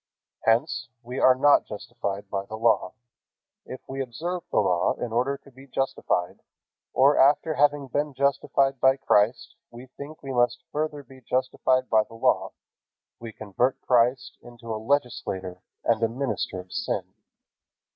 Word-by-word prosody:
Hence, 120 +6 +1
we 125 +2 -5
are 130 - +6
not 145 +3 +4
justified 100 -2 -5
by 100 -1 -3
the 110 - -6
Law. 110 -5 +2 0.7
If 130 - -8
we 135 0 -4
observe 165 +9 -4
the - - -2
Law 90 -1 +2
in 120 -2 -5
order 130 +4 +1
to 140 - -19
be 135 +2 -15
justified, 125 -9 -1 0.5
or 140 +3 +4
after 145 +3 +4
having 145 -1 +2
been 145 +2 -2
justified 135 0 +1
by 130 +1 +4
Christ, 115 -3 +2 0.2
we 120 +2 -11
think 145 +2 -9
we 135 -1 -5
must 120 -1 +1
further 150 -1 -3
be 130 0 -16
justified 130 +1 0
by 110 -1 +4
the 115 - -14
Law, 115 - +1 0.7
we 115 -1 -8
convert 110 +5 -1
Christ 125 +1 +1
into 120 -1 -8
a 110 - -4
legislator 95 -8 -2 0.2
and 115 -1 +1
a 115 - +2
minister 115 -6 -3
of 90 0 -11
sin. - - -3
125 Hz, 155 wpm, -26 LUFS, 115-140 Hz, 0.7 s, are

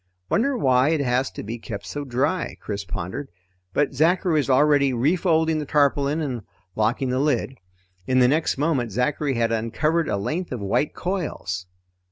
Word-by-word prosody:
Wonder 270 +3 +2
why 130 - +3
it 160 -2 +1
has 130 0 +1
to - - -8
be 115 +3 -5
kept 100 -3 -7
so 145 +11 -5
dry? 145 +7 -1
Chris 100 -1 -4
pondered, 95 +9 -5 0.4
but 145 +7 +1
Zachary 170 +5 +2
was 150 -3 +1
already 140 0 +4
refolding 160 +4 +2
the 150 - -3
tarpaulin 145 +1 +2
and 130 -6 -3 0.3
locking 120 +5 0
the 130 - 0
lid. 135 -2 0 0.5
In 130 - +2
the 125 -1 +6
next 155 +3 +1
moment, 135 -6 0
Zachary 135 +5 0
had 115 -1 +1
uncovered 150 +9 0
a - - 0
length 160 - -3
of 125 - -3
white 100 +9 0
coils. 150 - -3
135 Hz, 170 wpm, -23 LUFS, 120-155 Hz, 0.5 s, the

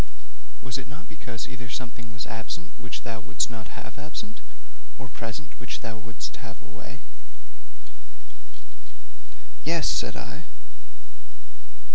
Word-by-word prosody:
'Was 130 0 +4
it 130 - -3
not 150 +4 -5
because 125 -7 -1
either 125 -1 -3
something 120 0 -1
was 115 -1 0
absent 115 +10 0
which 125 - -1
thou 115 -1 +1
wouldst 115 - +5
not 115 -1 -3
have 110 +5 -4
absent, 205 +9 -1 0.6
or 130 - -2
present 115 +5 -1
which 125 - +1
thou 115 -1 0
wouldst 115 +1 -1
have 115 -3 -4
away?' - - -6 2.6
'Yes,' - - +7
said - - +6
I. - - -2
120 Hz, 120 wpm, -33 LUFS, 115-135 Hz, 2.6 s, Yes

